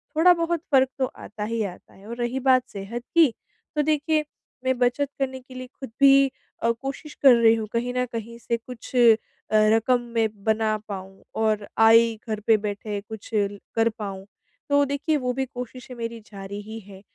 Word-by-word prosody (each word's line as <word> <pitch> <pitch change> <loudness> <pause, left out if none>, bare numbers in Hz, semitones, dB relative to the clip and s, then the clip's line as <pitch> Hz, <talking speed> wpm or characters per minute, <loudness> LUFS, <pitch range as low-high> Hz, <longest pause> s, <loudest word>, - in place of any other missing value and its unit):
थोड़ा 350 +3 +7
बहुत 335 -1 -1
फ़र्क 265 -2 +5
तो 260 - +3
आता 210 -3 -8
ही 225 +1 -2
आता 180 -2 -10
है 195 +2 -16
और 235 - -5
रही 240 +2 -1
बात 260 -1 +4
सेहत 210 +4 -6
की, 315 -8 +6 0.4
तो 300 - +3
देखिए 305 +1 +1 0.4
मैं 260 -1 +1
बचत 250 +3 +1
करने 260 -1 -2
के 255 0 -15
लिए 255 0 -7
खुद 265 - -7
भी 275 0 +7 0.4
अ, 230 - +4
कोशिश 270 +5 -6
कर 270 -2 +9
रही 230 -1 +5
हूँ 220 -1 -4
कहीं 245 +1 -1
न 250 - +2
कहीं 230 +1 -5
से 235 0 -1
कुछ 240 +2 -11
अ, 250 - +4 0.5
रकम 220 +3 +4
मैं 225 -1 +3 0.2
बना 220 -1 +1
पाऊँ 195 -1 -8
और 215 -2 0
आय 225 +1 +6
घर 215 -1 -2
पे 225 - +6
बैठे 205 0 -4
कुछ 220 -2 -8
कर 205 +2 0
पाऊँ। 195 -2 -5 0.4
तो 285 0 +4
देखिए 285 +3 0
वो 250 -2 -1
भी 265 +1 -1
कोशिशें 250 0 -8
मेरी 230 -1 -5
जा 195 -1 -8
रही 205 +3 -7
है। 195 -2 -13
235 Hz, 190 wpm, -24 LUFS, 215-265 Hz, 0.5 s, कर